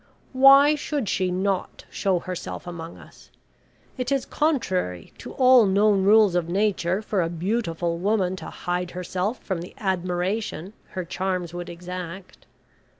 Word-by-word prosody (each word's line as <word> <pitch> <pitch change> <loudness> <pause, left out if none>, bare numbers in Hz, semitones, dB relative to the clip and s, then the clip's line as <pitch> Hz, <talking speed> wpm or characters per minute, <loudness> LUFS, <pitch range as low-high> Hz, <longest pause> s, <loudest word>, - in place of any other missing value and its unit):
Why 275 +3 +7
should 290 -5 -3
she 185 0 0
not 190 +1 -2
show 190 -3 0
herself 180 +1 -6
among 170 -1 -8
us? - - -17 0.7
It 250 +1 -2
is 275 -1 +1
contrary 190 - -1
to - - -9
all 255 -4 +6
known 200 0 +3
rules 210 -1 +5
of 175 -2 0
Nature 195 0 0
for 205 -3 0
a 165 - -1
beautiful 170 -2 -2
woman 190 -1 +1
to - - -8
hide 180 0 -3
herself 185 +5 -3
from 185 -4 -3
the 175 - -10
admiration 185 0 -2 0.2
her 185 - -2
charms 180 -1 -3
would 175 0 -6
exact. 180 +1 -8
185 Hz, 145 wpm, -24 LUFS, 175-215 Hz, 0.7 s, Why